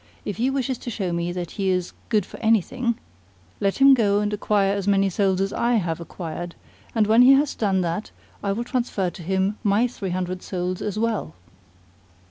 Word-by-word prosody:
If 205 - -4
he 245 +4 +1
wishes 265 -2 -1
to - - -6
show 195 -6 -2
me 170 +1 -1
that 175 -1 -5
he 195 -2 -1
is 180 -1 -1 0.2
good 210 -5 +2
for - - -11
anything, 230 +2 +1 0.6
let 195 0 0
him 275 0 +7
go 205 -5 +3
and 210 0 -1
acquire 205 -1 +1
as 200 -1 -3
many 195 -1 +3
souls 190 0 +1
as 195 +1 -1
I 240 +1 +1
have 170 -6 -1
acquired; 170 0 -6 0.4
and 220 -2 +4
when 220 +3 +5
he 260 +2 +8
has 280 +1 +3
done 195 -4 +1
that 175 +4 -2 0.3
I 200 - -1
will 225 +4 -1
transfer 235 -7 -1
to 175 - -11
him 190 +4 0
my 210 +3 +3
three 215 -6 -4
hundred 180 0 -3
souls 180 -1 -3
as 210 -1 -3
well." 225 - -1
200 Hz, 200 wpm, -23 LUFS, 185-230 Hz, 0.6 s, he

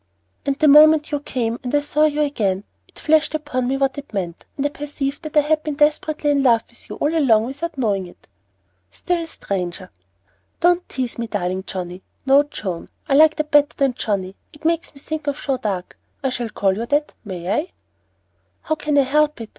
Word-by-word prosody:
"And 275 -1 +1
the 310 - +3
moment 305 +1 +7
you 290 - 0
came 240 -5 -2
and 250 +2 -2
I 290 - +3
saw 300 +1 +2
you 300 0 +1
again, 205 -10 0 0.2
it - - -21
flashed 310 0 +2
upon 255 -5 -2
me 270 +2 0
what 275 0 0
it 285 - -12
meant; 175 -3 -4
and 280 - -1
I - - +2
perceived 285 -1 -4
that 310 0 -4
I - - +8
had 305 +1 +1
been 305 -2 -4
desperately 300 0 +1
in 280 -1 +2
love 235 -4 +4
with 235 - -14
you - - -5
all 300 +3 0
along 230 -8 +4
without 285 +5 -5
knowing 200 -7 0
it." 175 - -18 0.6
"Still 345 -2 -2
stranger." 180 - -4 0.7
"Don't 355 +1 +2
tease 255 -3 -4
me, 235 - -2
darling 190 -2 -2
Johnnie, 180 0 -5 0.2
no, 275 +1 +6
Joan; 195 - -6 0.2
I 280 - +1
like 310 +2 +6
that 305 -1 -3
better 290 0 +4
than 275 -3 +2
Johnnie. 195 -5 -2 0.2
It 295 +1 -17
makes 335 0 0
me - - -13
think 310 +1 -5
of 285 0 -1
Joan 270 -2 -1
d'Arc. 190 -4 -3 0.3
I 265 - +2
shall 240 -2 -3
call 195 -3 +1
you 230 +3 -4
that, 290 +3 0
may 185 -3 -5
I?" 310 - 0 1.0
"How 315 - 0
can 300 -1 -1
I - - +7
help 300 +1 +2
it? 225 -1 -7
280 Hz, 210 wpm, -21 LUFS, 225-300 Hz, 1.0 s, I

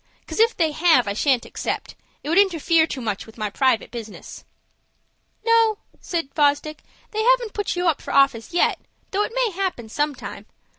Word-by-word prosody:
'Cause - - -6
if 460 +1 +4
they 320 -3 +2
have, 315 -7 +3
I 200 - -1
shan't 255 +2 +1
accept. - - -4 0.3
It 295 - -5
would 340 +4 +4
interfere 335 -4 +3
too 265 - -5
much 210 -3 -3
with 220 - -15
my 215 -2 -3
private 260 -1 +1
business." 225 -3 -9 1.0
"No," 455 -2 +4 0.2
said 330 -6 -4
Fosdick, 295 +1 +1 0.3
"they 435 - -1
haven't 485 -2 +2
put 410 -3 -2
you 355 0 0
up 315 -4 +1
for - - -7
office 275 -2 +3
yet, 350 - +2 0.3
though 395 - 0
that 420 - -1
may - - 0
happen 360 - -3
sometime. 295 +4 -4
320 Hz, 180 wpm, -22 LUFS, 260-400 Hz, 1.0 s, if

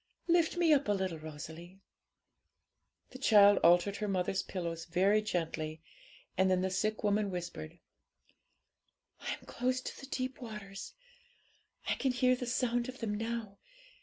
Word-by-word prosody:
Lift 340 0 +3
me 335 -3 +5
up 285 -4 +2
a 205 - +3
little, 190 -4 -2
Rosalie.' 160 +4 -9 1.3
The 260 - -9
child 205 -5 +7
altered 175 +4 +4
her 210 - -2
mother's 190 0 0
pillows 170 -3 -4
very 195 +5 +3
gently, 160 -5 -3 0.5
and 190 +1 +3
then 185 -1 +3
the 190 0 0
sick 215 +4 -1
woman 205 0 +2
whispered 175 - -6 1.4
'I'm - - -5
close 255 +1 -1
to - - -7
the 270 - -9
deep 255 0 -3
waters; 210 -4 -8 0.9
I - - +2
can 265 -2 0
hear 255 0 +3
the 250 -1 -5
sound 245 0 0
of 255 - -7
them 225 -4 -2
now. 225 -2 -4
205 Hz, 145 wpm, -33 LUFS, 180-245 Hz, 1.4 s, child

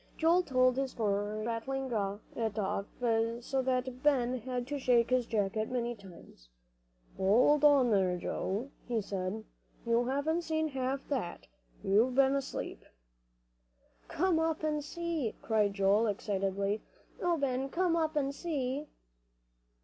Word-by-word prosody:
Joel 335 +3 +4
told 255 -5 +2
his 270 0 0
story, 210 -2 -1
rattling 260 +3 -3 0.4
it 225 -2 -2
off 200 -1 -1 0.6
so 270 +1 0
that 255 0 -1
Ben 255 -4 +2
had 250 +1 -3
to 285 +2 -4
shake 245 -2 +3
his 250 -2 +2
jacket 215 0 -1
many 240 -1 -1
times. 180 - -15 0.7
"Hold 240 +10 +4
on 280 -5 +6
there, 185 -3 +2
Joe," 210 +8 -3 0.2
he 240 -2 0
said, 195 +1 -3 0.4
"you 235 +1 +2
haven't 290 +6 0
seen 315 -1 -1
half 270 0 -3
that. 235 -12 -3 0.4
You've 220 +6 +3
been 270 0 +5
asleep." 275 -1 -4 1.2
"Come 350 0 +1
up 320 -1 0
and 300 -1 0
see," 330 -6 -3
cried 210 -3 +1
Joel, 200 +3 +3
excitedly. 200 0 -1 0.4
"Oh, 350 -1 +2
Ben, 270 -1 -1
come 350 +2 +1
up 320 -1 0
and 280 -2 0
see." 285 -2 -3
255 Hz, 135 wpm, -32 LUFS, 215-285 Hz, 1.2 s, on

